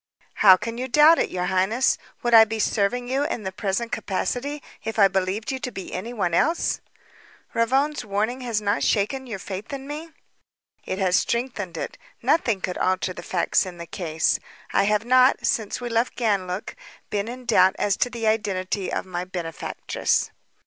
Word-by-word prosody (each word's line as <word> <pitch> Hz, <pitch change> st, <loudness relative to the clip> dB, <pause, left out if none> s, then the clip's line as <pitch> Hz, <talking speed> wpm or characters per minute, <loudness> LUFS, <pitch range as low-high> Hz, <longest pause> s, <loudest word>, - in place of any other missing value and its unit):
"How 190 Hz, -3 st, +7 dB
can 230 Hz, +4 st, -5 dB
you 255 Hz, -, -2 dB
doubt 300 Hz, +6 st, +6 dB
it, -, -, +1 dB
your 180 Hz, -1 st, -2 dB
highness? 190 Hz, +7 st, +2 dB, 0.2 s
Would 240 Hz, -1 st, +1 dB
I 225 Hz, -1 st, +10 dB
be 220 Hz, 0 st, -3 dB
serving 220 Hz, +3 st, 0 dB
you 270 Hz, +3 st, 0 dB
in 290 Hz, -7 st, -3 dB
the 190 Hz, -, -3 dB
present 205 Hz, +5 st, -2 dB
capacity 265 Hz, +9 st, -2 dB, 0.2 s
if 225 Hz, 0 st, -4 dB
I 200 Hz, -2 st, +7 dB
believed 190 Hz, +4 st, -1 dB
you 265 Hz, -, -3 dB
to 255 Hz, -1 st, -4 dB
be 190 Hz, -, -7 dB
anyone 200 Hz, -2 st, -2 dB
else?" 325 Hz, -, +1 dB, 0.7 s
"Ravone's 270 Hz, +6 st, +1 dB
warning 215 Hz, +5 st, -1 dB
has 235 Hz, -4 st, -1 dB
not 205 Hz, +2 st, +1 dB
shaken 260 Hz, +6 st, 0 dB
your 220 Hz, -5 st, -4 dB
faith 195 Hz, +4 st, -7 dB
in 275 Hz, -1 st, -6 dB
me?" 305 Hz, +3 st, -6 dB, 0.8 s
"It 185 Hz, -, -2 dB
has 185 Hz, -2 st, +3 dB
strengthened 235 Hz, -8 st, -2 dB
it. -, -, -5 dB, 0.2 s
Nothing 230 Hz, -, +2 dB
could 180 Hz, -1 st, -3 dB
alter 185 Hz, 0 st, 0 dB
the 175 Hz, -, -8 dB
facts 175 Hz, +1 st, +1 dB
in 185 Hz, -3 st, -8 dB
the 170 Hz, -, -7 dB
case. 160 Hz, -2 st, 0 dB, 0.3 s
I 195 Hz, -, +3 dB
have 210 Hz, +2 st, +1 dB
not, 255 Hz, +2 st, +4 dB
since 220 Hz, -3 st, 0 dB
we 245 Hz, -, -4 dB
left 230 Hz, +1 st, 0 dB
Ganlook, 200 Hz, -3 st, -1 dB, 0.4 s
been 205 Hz, 0 st, -1 dB
in 250 Hz, +1 st, -7 dB
doubt 190 Hz, -5 st, +4 dB
as 200 Hz, -2 st, +1 dB
to 245 Hz, -, +1 dB
the 235 Hz, -2 st, -4 dB
identity 200 Hz, -3 st, 0 dB
of -, -, -2 dB
my 180 Hz, -1 st, -4 dB
benefactress." 175 Hz, -5 st, -2 dB
215 Hz, 180 wpm, -24 LUFS, 190-245 Hz, 0.8 s, I